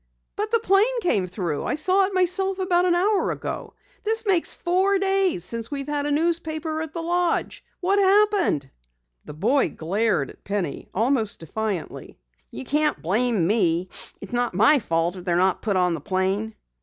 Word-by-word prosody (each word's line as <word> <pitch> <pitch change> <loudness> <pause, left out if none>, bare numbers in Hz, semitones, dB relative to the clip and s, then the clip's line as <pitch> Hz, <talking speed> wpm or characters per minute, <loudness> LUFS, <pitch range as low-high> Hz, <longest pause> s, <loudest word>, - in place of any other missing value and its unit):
"But 420 +1 -2
the 460 - +3
plane 440 +4 +2
came 200 - +1
through! 175 -5 -3
I - - -1
saw 375 +5 +3
it 390 - -5
myself 370 +1 +1
about 365 -2 +2
an 350 -1 +3
hour 395 +3 +1
ago. - - -5 0.3
This 445 +1 0
makes 370 -5 +3
four 380 +3 +1
days 385 - +1
since 230 +1 -1
we've 275 -1 -5
had 290 -1 -1
a - - -1
newspaper 315 0 -1
at 320 -1 -5
the 330 0 -5
lodge. 350 0 -1 0.2
What 390 +3 +2
happened?" 395 - +2 0.5
The - - -9
boy 240 - +2
glared 185 -2 -1
at - - -21
Penny 195 -8 -4
almost 225 0 0
defiantly. 200 +2 -5 0.3
"You 125 - -8
can't 300 +1 +1
blame 210 +1 0
me. 180 -3 +1 0.3
It's 200 - -10
not 240 -5 -1
my 285 +9 +5
fault 170 -3 -1
if 180 - -9
they're 175 -1 0
not 185 +1 +2
put 205 -4 0
on 180 -1 +2
the 165 - -4
plane." 195 +4 -1
285 Hz, 175 wpm, -23 LUFS, -, 0.5 s, my